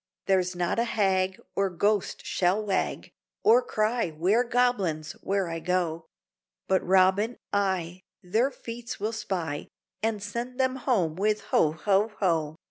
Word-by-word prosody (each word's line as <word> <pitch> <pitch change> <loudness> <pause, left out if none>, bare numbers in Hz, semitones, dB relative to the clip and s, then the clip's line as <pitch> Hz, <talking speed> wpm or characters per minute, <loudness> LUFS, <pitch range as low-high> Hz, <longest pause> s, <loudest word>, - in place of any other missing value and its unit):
There's 185 -1 +1
not 175 +5 0
a - - +3
hag 190 -4 +1 0.2
Or 195 0 +1
ghost 200 +3 0
shall 190 +4 +1
wag, 195 -2 -1 0.3
Or 455 +4 +6
cry, 225 - 0
ware 180 +10 +2
Goblins! 235 -11 0
where 195 -1 0
I 165 0 -4
go; 170 -1 -1 0.6
But 190 0 +2
Robin, 190 +5 +3 0.2
I, 185 -3 0 0.2
their 220 +9 +2
feats 235 -3 -7
will 215 +3 -2
spy, 170 -9 -3 0.3
And 215 -2 -1
send 235 +5 -5
them 260 0 +1
home 195 - 0
with 210 +2 +1
ho! 155 -1 +4
ho! 200 +6 +1
ho! 160 -5 0
195 Hz, 140 wpm, -27 LUFS, 180-225 Hz, 0.6 s, Or